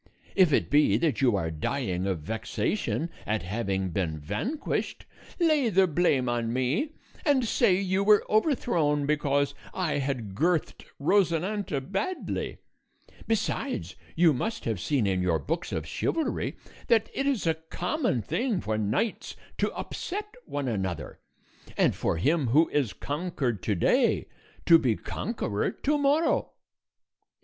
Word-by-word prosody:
If 185 -5 +5
it - - +1
be 145 -8 +5
that 150 +1 0
you 125 -5 +4
are 80 -4 -1
dying 90 - -2
of 90 -5 -1
vexation 110 - -2 0.2
at 105 -4 0
having 95 -1 -2
been 80 -3 -1
vanquished, 105 - -3 0.3
lay 310 -7 +3
the 190 -1 +4
blame 150 -6 +2
on 120 -1 0
me, 135 - 0 0.3
and 280 -6 +3
say 185 -4 +3
you 190 0 +1
were 210 0 +5
overthrown 175 - +2
because 140 -1 +1 0.2
I 175 -6 0
had 130 -7 -3
girthed 165 - 0
Rosinante 180 +1 +1
badly; 360 - -2 0.7
besides, 225 - -1 0.2
you 165 -2 +5
must 220 - -3
have 110 -5 -1
seen 130 - +1
in 95 -2 +1
your 90 -3 +2
books 70 - -3
of 80 - -2
chivalry 310 - -2 0.3
that 225 -3 +3
it 275 - -1
is 265 -10 0
a 165 - +3
common 160 - -2
thing 205 - 0
for 110 -7 -2
knights 110 - -1 0.2
to - - +1
upset 420 +3 -5
one 145 -2 -3
another, 95 -8 -3 0.6
and - - +4
for - - -1
him 145 - +2
who 155 +8 +4
is 130 -10 0
conquered 145 - -2
to 105 - 0
day 85 - +2 0.4
to 165 -1 +8
be 120 -7 +1
conqueror 105 - -2
to 295 +2 0
morrow." 290 +4 +2
145 Hz, 140 wpm, -27 LUFS, -, 0.7 s, to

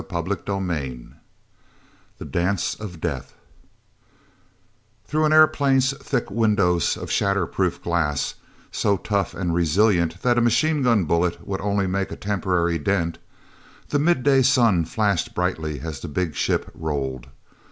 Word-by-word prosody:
CHAPTER 85 +2 -2
XVIII 80 -11 -3 1.1
The - - -8
Dance 90 +2 -1
of 95 -6 -8
Death 75 -7 -4 1.7
hrough 155 +1 +1
an - - 0
airplane's 140 -3 +4
thick - - -3
windows 100 -6 +2
of - - -6
shatter 100 -2 +1
proof 90 0 -2
glass, 80 -5 0 0.4
so 100 -1 +1
tough 100 -1 -2
and 90 -3 -2
resilient 85 0 +2
that 120 -1 +3
a - - +2
machine 140 +6 +2
gun 115 -6 +3
bullet 85 +2 0
would 95 -1 -3
only 100 0 0
make 95 +1 -2
a - - -4
temporary 90 -4 0
dent, 85 0 -1 0.7
the 145 - +1
midday 140 -4 +3
sun 120 - +3
flashed 100 0 -1
brightly 80 -5 -2
as 80 -3 -5
the - - -7
big 80 +2 -2
ship - - -1
rolled. 70 -5 -4
95 Hz, 135 wpm, -23 LUFS, 85-110 Hz, 1.7 s, airplane's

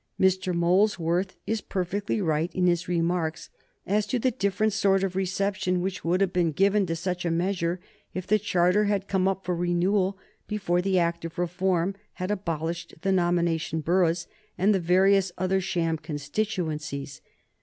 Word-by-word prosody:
Mr. 185 0 +2
Molesworth 175 0 +1
is 220 -1 -1
perfectly 195 +3 -2
right 165 -2 0
in 185 - +2
his 175 -1 +1
remarks 170 -2 -1 0.3
as 210 +2 +1
to 255 - 0
the 255 +2 +1
different 215 -1 0
sort 195 -1 +2
of 185 -1 -2
reception 190 -1 0
which 185 +1 -3
would 180 +3 +1
have 195 -2 +1
been 175 -2 +2
given 195 +4 +2
to 165 - -1
such 180 +1 -3
a 175 - 0
measure 175 0 0 0.4
if 185 -1 -3
the 215 +2 +3
charter 185 0 +2
had 200 -1 0
come 190 -1 +1
up 195 0 -1
for 180 0 0
renewal 185 +3 +1 0.3
before 190 -4 0
the 190 0 +1
Act 170 -1 0
of 165 +1 -7
Reform 180 +1 0 0.2
had 185 +2 -3
abolished 170 -3 -3
the 195 - +2
nomination 170 -3 +1
boroughs 170 +1 +1 0.3
and 200 +4 +3
the 195 - +2
various 190 +2 +3
other 185 +1 +1
sham 165 -3 -1
constituencies. 150 -3 -3
180 Hz, 165 wpm, -26 LUFS, 170-195 Hz, 0.4 s, the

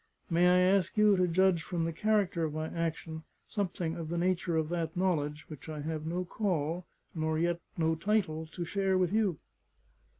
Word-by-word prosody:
May 175 +2 +4
I 180 0 +5 0.2
ask 185 +1 0
you 210 -1 +6
to 180 0 +3
judge 180 0 +3
from 170 -1 -2
the 165 - -2
character 205 -2 +1
of 155 -1 -2
my 155 0 -2
action, 165 -1 -3 0.3
something 180 -5 -2
of 165 -2 -5
the 170 - -2
nature 175 -1 +1
of 155 -1 0
that 170 -1 -2
knowledge, 155 -5 0
which 155 0 -10
I 155 -1 -5
have 155 +1 -4
no 180 +2 -2
call, 175 -3 -1 0.3
nor 160 -1 -1
yet 170 +1 +1 0.2
no 160 -1 +2
title, 160 -3 0
to 170 +2 -5
share 195 +1 +1
with 185 0 +1
you?" 210 -7 +2
170 Hz, 190 wpm, -31 LUFS, 160-185 Hz, 0.3 s, you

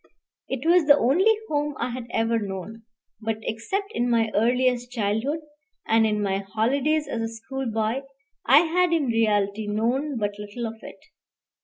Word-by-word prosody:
It 265 +2 -4
was 345 -2 +5
the 285 -1 +8
only 320 - +4 0.2
home 295 -1 -1
I 250 - -2
had 240 -1 -6
ever 225 0 +1
known; 205 +2 -6 0.4
but 220 0 -2
except 385 - -3
in 245 - -1
my 225 -2 +2
earliest 245 +2 +1
childhood, 230 +7 -1 0.4
and 225 0 +3
in 210 -1 0
my 195 -1 0
holidays 265 +10 0
as 235 -5 -3
a 225 - -1
schoolboy, 230 0 -3 0.4
I 275 +5 +7
had 345 +1 +2
in 320 -4 +2
reality 215 -3 +1
known 245 +7 -1
but 205 -1 -2
little 210 +3 -5
of 225 0 -6
it. - - -10
230 Hz, 160 wpm, -25 LUFS, 220-280 Hz, 0.4 s, the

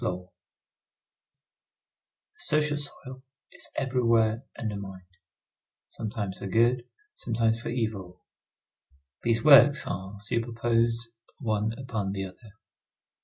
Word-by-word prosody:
The 90 -3 -3 2.1
social 150 -1 +1
soil 130 -2 -3 0.3
is - - -5
everywhere 115 -4 +2 0.2
undermined, 100 -4 -5 0.9
sometimes 105 -3 -4
for - - -5
good, 120 +4 +3 0.3
sometimes 115 -1 0
for - - -4
evil. 110 -7 -3 1.0
These 115 -1 +1
works 145 0 +8
are 95 +2 -5
superposed 115 +1 0 0.3
one 110 -3 -1
upon 110 -7 -3
the 95 -1 -3
other. 105 +3 -13
115 Hz, 90 wpm, -28 LUFS, 100-120 Hz, 2.1 s, works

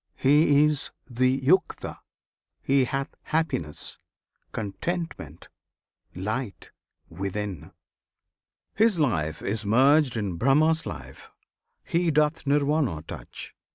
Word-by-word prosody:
He 145 +1 +5
is 150 -2 0 0.2
the 130 +1 +1
Yukta; 185 +8 +1 0.6
he 135 -1 +3
hath 135 +3 -3
happiness, 155 - -2 0.5
Contentment, 110 - -5 0.7
light, 105 +4 -4 0.4
within: 95 0 -5 1.0
his 220 -3 +3
life 80 - 0
is 110 +2 -2
merged 130 +4 +4
In 100 -5 -2
Brahma's 155 - +3
life; - - -9 0.5
he 175 -1 +1
doth 150 -1 +1
Nirvana 140 - +1
touch! - - -9
135 Hz, 90 wpm, -26 LUFS, 105-155 Hz, 1.0 s, He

